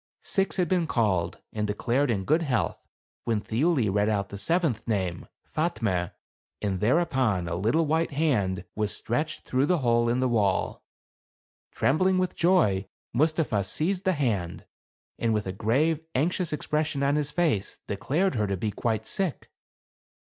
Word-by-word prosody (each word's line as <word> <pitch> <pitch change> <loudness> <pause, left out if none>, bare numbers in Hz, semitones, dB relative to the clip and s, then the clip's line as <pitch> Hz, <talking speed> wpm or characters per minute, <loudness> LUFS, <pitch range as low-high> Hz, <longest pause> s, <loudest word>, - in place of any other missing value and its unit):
Six 195 -1 0
had 180 -2 +2
been 175 -1 +1
called, 95 - 0 0.2
and 105 -1 -1
declared 120 +7 0
in 100 -5 0
good 160 - +3
health, 125 - -1 0.4
when 115 -2 +1
Thiuli 125 +3 +1
read 105 +1 +2
out 100 -2 -1
the 100 - -7
seventh 150 - 0
name, 95 -6 -2 0.3
Fatme, 110 - 0 0.5
and 95 -3 -1
thereupon 120 - +1
a 85 - -3
little 115 - +1
white 160 +3 +1
hand 120 - 0
was 105 -1 -1
stretched 150 +7 -2
through 130 +3 0
the 180 - +3
hole 120 0 +3
in 120 +2 +1
the 130 - +2
wall. 105 -6 +1 0.9
Trembling 185 +6 +2
with 185 0 0
joy, 165 - +3 0.3
Mustapha 150 -6 +1
seized 175 - -1
the 185 - +2
hand, 105 - -2 0.5
and 115 -1 +1
with 105 - -1
a 95 - -2
grave, 135 - +1 0.2
anxious 170 +5 +1
expression 150 -1 -1
on 140 +1 +2
his 150 -1 0
face, 150 - 0
declared 150 - 0
her 105 -3 0
to 100 -1 -1
be 105 +3 -2
quite 110 +1 -1
sick. 190 -7 -2
120 Hz, 155 wpm, -27 LUFS, 105-160 Hz, 0.9 s, good